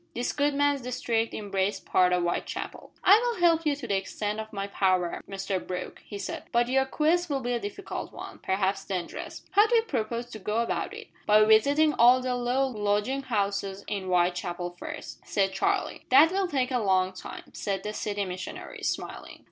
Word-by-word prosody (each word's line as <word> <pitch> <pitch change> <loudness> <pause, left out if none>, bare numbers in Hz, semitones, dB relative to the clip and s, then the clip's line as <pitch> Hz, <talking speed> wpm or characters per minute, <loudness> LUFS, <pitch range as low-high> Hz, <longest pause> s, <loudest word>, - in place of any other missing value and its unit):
This 240 +1 -1
good 290 0 +1
man's 285 -1 +2
district 230 -2 -1
embraced 200 -1 -2
part 180 -1 +3
of 180 -1 +2
Whitechapel. 175 - -4
"I 400 +3 +8
will 475 -3 -1
help 330 -2 +4
you 290 - +2
to 280 -4 -7
the 200 - +1
extent 205 +2 -2
of 220 0 -6
my 195 -1 -3
power, 185 -3 +1
Mr 195 -1 -2
Brooke," 180 -1 -6
he 205 - -7
said, - - -5
"but 240 +1 +2
your 265 +1 +3
quest 325 +5 +1
will 280 -2 0
be 245 0 -1
a 240 - 0
difficult 230 - -6
one, - - -9
perhaps 195 +1 0
dangerous. 180 -3 -5
How 415 +2 +6
do 475 - +2
you 455 - +5
propose 235 - -2
to 215 - -7
go 210 +3 -2
about 235 0 -1
it?" - - -10 0.2
"By 215 0 +7
visiting 285 +8 +5
all 245 +2 +6
the 255 0 -1
low 245 +2 +1
lodging 210 +2 0
houses 200 -5 -2
in 200 -2 -3
Whitechapel 175 -1 0
first," - - -7
said 195 -1 0
Charlie. 190 - -1
"That 290 +6 +7
will 385 0 +1
take 265 -5 0
a 250 - +1
long 190 -3 +2
time," 185 - -8
said 195 -2 -3
the 210 0 -4
City 205 -1 -2
Missionary, 185 0 -7
smiling. - - -4
220 Hz, 195 wpm, -28 LUFS, 195-270 Hz, 0.2 s, I